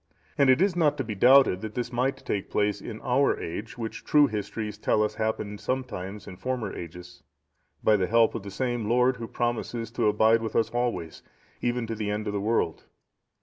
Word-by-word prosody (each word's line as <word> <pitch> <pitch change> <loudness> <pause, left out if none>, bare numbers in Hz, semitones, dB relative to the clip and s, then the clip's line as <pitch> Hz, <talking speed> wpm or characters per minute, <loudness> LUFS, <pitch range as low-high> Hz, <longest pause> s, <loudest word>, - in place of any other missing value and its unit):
And 140 -2 +4
it 130 +7 +5
is 195 -3 +1
not 150 -4 +2
to 135 - -1
be 110 -3 -4
doubted 125 -2 +5
that 110 -1 -6
this 125 0 -3
might 130 +3 0
take 100 - -2
place 105 -1 0
in 110 -2 -7
our 130 +2 +2
age, 105 +9 -6
which 115 -2 -5
true 150 -1 +5
histories 105 -2 -4
tell 105 - +2
us 105 - -1
happened 110 -2 -3
sometimes 105 -6 -4
in 90 - -10
former 130 -1 -3
ages, 90 +1 -9 0.6
by 110 -1 +5
the 95 -2 0
help 115 +2 +4
of 115 - -4
the 100 - -8
same 120 0 -2
Lord 125 +2 +3
who 115 -1 -6
promises 120 -1 -2
to 115 -2 0
abide 110 +2 +4
with 110 - -4
us 115 - +2
always, 120 -9 -2 0.4
even 120 0 0
unto 115 0 -4
the 105 -2 -3
end 105 +1 -2
of 105 - -3
the 100 - -1
world. 105 -6 0
115 Hz, 205 wpm, -27 LUFS, 105-125 Hz, 0.6 s, it